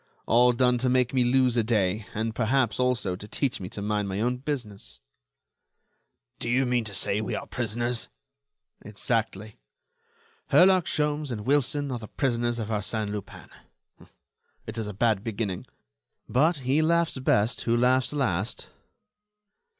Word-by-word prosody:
All 120 +2 +5
done 125 0 +2
to 130 +1 +1
make 125 0 +2
me 130 -2 +3
lose 125 0 +3
a 115 - +3
day, 105 -2 0
and, 110 +1 -2
perhaps, 125 0 +1
also, 125 -7 0
to 105 +3 -10
teach 135 +3 -1
me 90 -1 -6
to 100 - -6
mind 105 -1 -1
my 95 +1 -3
own 125 +3 0
business." 105 - -6 1.4
"Do - - -3
you 130 +2 +2
mean 125 -1 +1
to 100 -2 -6
say 100 +2 -1
we 110 - -3
are - - -5
prisoners?" 120 +1 -2 0.7
"Exactly. 110 0 -3 0.9
Herlock 185 -1 +5
Sholmes 150 -1 0
and 110 -3 -4
Wilson 145 +3 +1
are 125 - -3
the 110 - -9
prisoners 120 -2 -1
of 110 -2 -4
Arsène 105 0 -2
Lupin. 105 -2 -8 1.2
It's 110 +1 -6
a 105 -2 -3
bad 105 0 +1
beginning; 105 -4 -4 0.6
but 155 +6 +3
he 140 +5 +3
laughs 165 -3 +2
best 115 -3 +2
who 115 0 +1
laughs 125 +1 +3
last." 110 - -1
120 Hz, 150 wpm, -26 LUFS, 105-130 Hz, 1.4 s, All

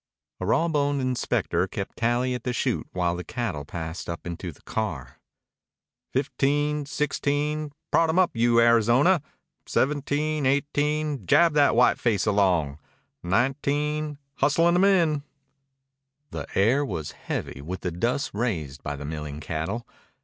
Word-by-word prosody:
A - - -3
raw 165 - +3
boned 145 -3 +1
inspector 130 -2 0
kept - - -5
tally 120 +2 +1
at 125 -2 -4
the 125 - -2
chute 115 - -1
while 90 -1 0
the 90 - -5
cattle 90 -7 -3
passed 80 +2 -6
up 85 - -5
into 85 +1 -5
the - - -21
car. 80 - -4 0.9
"Fifteen, 145 +2 0
sixteen 150 +1 -1 0.2
prod 165 -1 +4
'em 160 - +1
up, 185 -2 +4
you 115 0 +3
Arizona 120 - +4 0.5
seventeen, 145 +1 0
eighteen 145 - 0
jab 170 - +5
that 145 -1 +4
whiteface 115 -3 +3
along 90 -9 +2 0.4
nineteen 145 +8 0 0.2
hustle 150 +5 +3
'em 175 +2 +4
in." 170 -7 +3 1.1
The - - -5
air 120 +9 +3
was 80 - -4
heavy 65 - -5
with 90 +5 -6
the 90 - -2
dust 120 +11 -1
raised 80 - -2
by 75 - -4
the 75 +1 -7
milling 75 -1 -5
cattle. 80 +10 -3
125 Hz, 135 wpm, -25 LUFS, 90-150 Hz, 1.1 s, jab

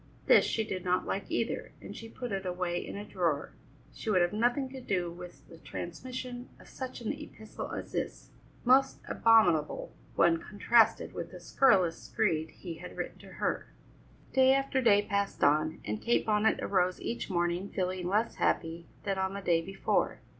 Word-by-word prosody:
This - - +6
she 225 - 0
did 185 -4 -4
not 180 0 +1
like 195 - -3
either, 230 - -2
and 205 - -9
she 225 - -8
put 245 0 -6
it 195 -1 -2
away 180 -1 -2
in - - -7
a 205 - -6
drawer; 170 -8 -1 0.4
she - - -5
would 185 -4 +4
have 175 - 0
nothing 245 +5 +1
to 265 0 -8
do 180 -7 -1
with 175 +1 -11
the 165 - -14
transmission 250 +9 -6
of - - -16
such 260 -2 -7
an 230 - -1
epistle 290 -7 -8
as - - -5
this. - - -4 0.3
Most 270 +2 +5
abominable 180 -10 +3 0.2
when 170 -1 +4
contrasted 225 +5 +3
with - - -5
the - - -10
scurrilous 185 -11 +3
screed 160 0 0
he 170 -3 -8
had 180 - -9
written - - -5
to - - -13
her. - - -2 0.7
Day 265 0 +6
after 275 -1 +1
day 205 -4 +5
passed 200 -1 -1
on, 155 +2 +3
and 105 +1 -3
Kate 240 - +2
Bonnet 215 0 +2
arose 185 -2 +1
each 235 - -4
morning 175 +1 0
feeling 185 -1 -2
less 210 +5 0
happy 165 0 0 0.2
than 195 -1 -1
on 190 +1 -1
the 200 - -4
day 170 -3 +2
before. 195 +3 0
195 Hz, 180 wpm, -31 LUFS, 175-230 Hz, 0.7 s, This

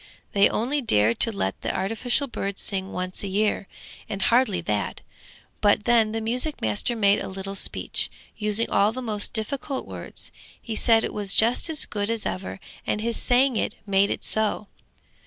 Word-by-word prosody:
They 200 0 +5
only 270 +6 0
dared 110 - +2
to 230 - +6
let 100 - -3
the - - -1
artificial 225 +8 0
bird 200 -6 -4
sing 190 -1 -1
once 185 0 -3
a 200 - -3
year, 200 0 0 0.4
and 200 -2 -4
hardly 230 -2 +3
that; 105 -10 -2 0.6
but 205 0 +3
then 230 -3 +4
the 225 0 -3
music 250 +7 -1
master 110 - -1
made 205 -2 +3
a - - -5
little 195 +1 -6
speech, 195 - -1 0.3
using 210 +1 0
all 205 +2 +3
the 255 +2 -6
most 210 -3 -1
difficult 260 +4 -2
words. - - -8 0.3
He 225 - -6
said 225 0 +4
it - - -3
was 200 -2 +1
just 235 +8 +4
as 310 -3 +3
good 205 0 -3
as 230 -1 -1
ever, 190 +1 -4 0.3
and - - 0
his 230 +1 -2
saying 250 0 +2
it - - -1
made 200 0 +3
it - - -3
so. 215 -1 +2
215 Hz, 180 wpm, -24 LUFS, 195-235 Hz, 0.6 s, to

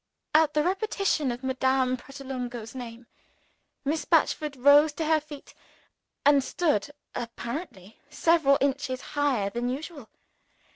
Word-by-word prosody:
At 310 -1 +4
the 300 - +3
repetition 380 - 0
of 240 +2 -7
Madame 260 0 +1
Pratolungo's 250 -3 -7
name, 240 -2 -8 0.8
Miss 305 +2 0
Batchford 305 -3 +1
rose 285 +4 +6
to 315 +2 -3
her 315 0 +3
feet 295 -1 -12 0.7
and 285 -1 +5
stood 290 - 0 0.2
(apparently) 235 - -6
several 300 -2 +3
inches 275 -1 0
higher 270 -9 +1
than 240 +2 -2
usual. 285 -2 -6
275 Hz, 115 wpm, -27 LUFS, 250-305 Hz, 0.8 s, rose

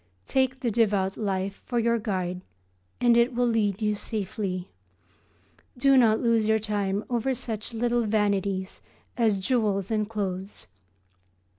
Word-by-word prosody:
Take 260 - 0
the 240 - 0
Devout 200 -4 +1
Life 195 -2 -3
for 245 - -2
your 235 0 +2
guide 185 -4 -3 0.6
and 240 -1 +4
it 235 +1 +3
will 245 0 +2
lead 220 -3 0
you 210 0 +2
safely. 195 -3 -4 1.1
Do 275 +2 +4
not 225 -4 +5
lose 230 -2 +2
your 220 0 +4
time 205 -1 -1
over 250 +2 0
such 220 -2 -4
little 240 0 0
vanities 200 -3 0 0.3
as 225 -4 +2
jewels 200 -2 0
and 215 -1 0
clothes. 195 -2 -4
215 Hz, 135 wpm, -26 LUFS, 195-235 Hz, 1.1 s, not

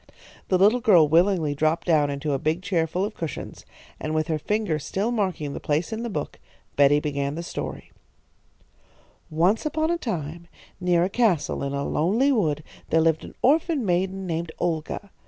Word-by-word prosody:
The 185 - +3
little 210 +6 +4
girl 180 -9 +5
willingly 165 -1 +3
dropped 155 +3 0
down 155 -4 +3
into 140 +1 -2
a 135 - 0
big 160 +5 -1
chair 170 -4 +1
full 180 +4 -1
of 210 - -5
cushions, 165 - -7 0.3
and 155 0 -3
with 155 +1 0
her 155 -1 0
finger 205 -1 -1
still 200 +9 -2
marking 185 -10 -1
the - - -5
place 155 +8 -1
in 220 - -3
the 235 - -3
book, 205 - -5 0.4
Betty 145 +1 +5
began 140 -1 -2
the 170 - -4
story: - - -6 1.4
"Once 175 +8 +2
upon 315 +1 0
a 345 - -1
time, 170 - -4 0.3
near 175 -2 +2
a - - +2
castle 205 -8 +1
in 140 0 -3
a 140 0 -2
lonely 220 - +2
wood, 155 - +1 0.3
there 160 - +3
lived 160 -1 +2
an - - -11
orphan 305 -1 +2
maiden 190 +1 0
named 165 -1 -3
Olga. 175 +4 -3
170 Hz, 180 wpm, -24 LUFS, 155-205 Hz, 1.4 s, girl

